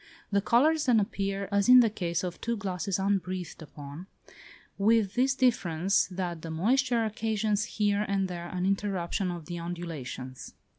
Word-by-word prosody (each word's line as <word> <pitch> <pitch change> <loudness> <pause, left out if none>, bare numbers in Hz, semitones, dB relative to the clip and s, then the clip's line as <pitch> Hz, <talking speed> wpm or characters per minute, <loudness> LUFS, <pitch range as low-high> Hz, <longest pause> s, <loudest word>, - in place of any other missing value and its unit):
The 200 0 +2
colours 295 +8 +3
then 235 -3 +5
appear 195 -1 -2
as 200 +2 +2
in 250 0 +10
the 240 - +6
case 175 -4 -2
of 180 -1 -5
two 235 0 -1
glasses 195 -1 -2
unbreathed 185 -3 -2
upon, 150 +3 -10 0.7
with 210 -1 +3
this 265 +3 +2
difference, 195 -8 +2
that 180 -3 -4
the 165 - -7
moisture 235 +8 +1
occasions 215 -1 -1
here 205 -3 0
and 195 -1 0
there 175 -1 -6
an 180 0 -3
interruption 195 -1 -1
of 170 -3 -6
the 175 +2 -5
undulations. 160 -7 -6
195 Hz, 155 wpm, -28 LUFS, 175-220 Hz, 0.7 s, in